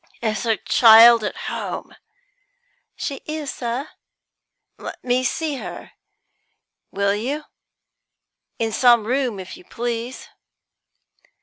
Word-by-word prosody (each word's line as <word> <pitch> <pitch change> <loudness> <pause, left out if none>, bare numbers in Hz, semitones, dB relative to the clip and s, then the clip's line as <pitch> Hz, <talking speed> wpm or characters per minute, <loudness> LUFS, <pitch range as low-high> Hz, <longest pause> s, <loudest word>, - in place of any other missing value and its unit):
"Is 215 -1 -1
her 225 -1 +1
child 230 -1 +7
at 210 - -4
home?" - - -5 1.0
"She 275 -2 -5
is, 305 -2 -4
sir." 245 +4 -4 0.9
"Let - - -9
me 250 +1 +1
see 295 +3 -2
her, - - -8 1.0
will 200 0 0
you? 265 +9 -3 1.1
In 225 -1 -1
some 240 0 +4
room, 250 -3 -1
if 185 0 -8
you 360 - -15
please." 240 -5 -5
240 Hz, 105 wpm, -21 LUFS, 225-270 Hz, 1.1 s, child